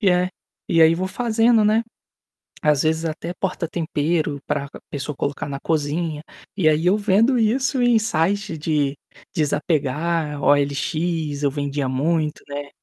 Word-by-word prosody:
E 205 - +3
é, 180 +1 +2 0.4
e 165 - +3
aí 160 +1 +7
vou 185 +2 -2
fazendo, 230 0 +3
né, 220 +2 +3 0.8
às 150 -2 +3
vezes, 160 +1 +1
até 165 +2 -4
porta-tempero 165 -4 -1
para 140 -1 -1
c - - -23 0.2
pessoa 145 0 -4
colocar 140 +1 -3
na 140 0 -4
cozinha, 155 0 -1 0.3
e 170 -6 +3
aí 155 +2 +1
eu 190 +4 +4
vendo 215 +5 +3
isso 255 +4 +1
em 240 -2 +4
site 200 -3 0
de 145 -2 0 0.4
desapegar, 150 0 0
OLX, 145 +2 0
eu 140 - +2
vendia 145 -1 -2
muito, 155 +3 0
né 145 0 -6
160 Hz, 145 wpm, -22 LUFS, 145-185 Hz, 0.8 s, aí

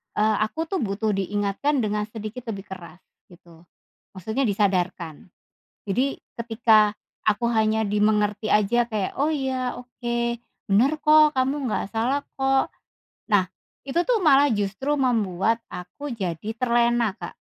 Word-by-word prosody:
eee, 215 0 +2
aku 320 +8 -4
tuh 385 - -1
butuh 215 -1 -1
diingatkan 205 +8 0
dengan 210 0 -1
sedikit 220 +2 -8
lebih 195 -1 -7
keras 180 -2 -10 0.3
gitu. 170 -1 -19 0.5
Maksudnya 220 +8 -2
disadarkan. 185 -6 -1 0.6
Jadi 250 +8 0 0.3
ketika 225 -2 +4 0.4
aku 215 +3 +2
hanya 220 0 +2
dimengerti 210 +1 +1
aja 230 +3 +3
kayak, 210 -4 -2
"Oh 290 +2 +2
iya 265 -4 -2
oke, 245 -1 -5 0.5
bener 235 +8 +4
kok 305 -1 +6
kamu 270 +1 0
nggak - - -1
salah 255 +6 0 0.2
kok." 270 0 +2 0.6
Nah 195 -3 +4 0.4
itu 275 - -3
tuh - - +2
malah 290 -3 +5
justru 205 +7 -1
membuat 225 -3 +1
aku 280 +11 -7
jadi 195 0 -4
terlena 235 -3 +2
Kak. - - -7
220 Hz, 130 wpm, -24 LUFS, 205-260 Hz, 0.6 s, kok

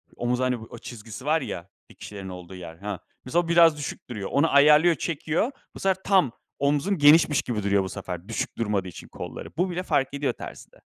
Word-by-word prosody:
Omuz, 120 +1 -1
hani 130 -1 +1
o 115 +1 -10
çizgisi 115 +2 -9
var 155 +2 +2
ya, 90 -8 -6 0.2
dikişlerin 100 -2 -9
olduğu 90 0 -9
yer, 85 -3 -9
ha, 100 +1 -5 0.3
mesela 170 +6 +1
biraz 165 -2 +6
düşük 145 -3 -6
duruyor, 105 -5 -5
onu 145 +4 +3
ayarlıyor, 150 +4 +6
çekiyor. 165 - -1 0.2
Bu - - -8
sefer 190 -1 0
tam 190 - +3 0.3
omzun 145 +7 +1
genişmiş 150 -1 +6
gibi 110 -4 -3
duruyor. 100 -1 +2
Bu 95 - -5
sefer 90 -2 -6
düşük 115 - -3
durmadığı 105 -4 -1
için 90 - -10
kolları, - - -8
bu 180 +2 +1
bile 180 +1 -3
fark 145 -6 0
ediyor 140 0 -1
terzide. - - -11
135 Hz, 190 wpm, -25 LUFS, 100-160 Hz, 0.3 s, biraz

